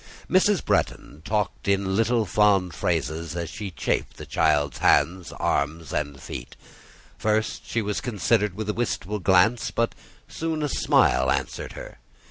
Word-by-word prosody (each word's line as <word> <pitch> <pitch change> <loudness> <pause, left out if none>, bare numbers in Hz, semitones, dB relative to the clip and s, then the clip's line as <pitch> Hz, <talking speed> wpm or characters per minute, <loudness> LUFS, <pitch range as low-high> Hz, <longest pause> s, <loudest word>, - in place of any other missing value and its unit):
Mrs. 190 +1 +3
Bretton 75 - -1
talked 105 +1 -2
in 100 -1 +1
little 115 +1 +2
fond 95 -2 +3
phrases 80 +3 -2
as 85 -1 -4
she 105 -2 -5
chafed 85 - -2
the - - -8
child's 75 -3 +1
hands, 85 +6 +2
arms, 75 +3 -1
and 75 -2 -2
feet; - - -8 0.6
first 110 0 -1
she 115 - 0
was 105 0 -2
considered 105 -3 +1
with 110 +1 -4
a 105 - 0
wistful 105 -3 -2
gaze, 95 +6 +3
but 115 0 0 0.3
soon 160 -1 -3
a 150 - 0
smile 65 - +3
answered - - -2
her. - - -10
100 Hz, 145 wpm, -25 LUFS, 80-110 Hz, 0.6 s, Mrs